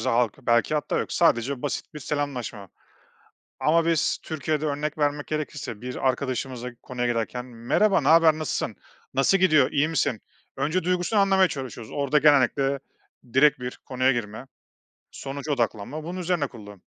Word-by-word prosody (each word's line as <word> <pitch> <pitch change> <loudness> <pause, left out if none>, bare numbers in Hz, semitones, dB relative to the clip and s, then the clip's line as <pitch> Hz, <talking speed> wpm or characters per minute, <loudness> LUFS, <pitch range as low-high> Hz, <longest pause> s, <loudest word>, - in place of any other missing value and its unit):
halk 120 -2 +1
belki 120 +5 +2
hatta 150 - -1
yok, - - -3
sadece 125 +3 +2
basit 145 - -4
bir - - -5
selamlaşma. 135 -9 -4 0.9
Ama 165 +2 +3
biz 165 -3 +1
Türkiye'de, 155 0 -2
örnek 150 +1 -2
vermek 145 -1 0
gerekirse, 145 -7 -4
bir 125 0 -5
arkadaşımızla 130 -1 -3
konuya 125 -1 -2
girerken, 120 +1 -2
"Merhaba, 125 - +1
ne - - -2
haber, 165 -1 +6
nasılsın, 155 - -2 0.4
nasıl 135 +8 +3
gidiyor, 155 -8 +4
iyi 145 +1 +2
misin?" 130 -8 0 0.4
Önce 155 +7 0
duygusunu 180 +4 +1
anlamaya 195 -1 +4
çalışıyoruz. 130 -7 -7
Orada 140 +1 +1
genellikle 140 -1 +3 0.5
direkt 140 0 +5
bir 125 0 -6
konuya 130 0 +2
girme, 120 +1 -4 0.6
sonuca 140 +2 -5
odaklanma, 120 +4 -2
bunun 175 +3 -5
üzerine 175 -4 0
kurulu. 105 -6 -12
140 Hz, 145 wpm, -25 LUFS, 125-155 Hz, 0.9 s, haber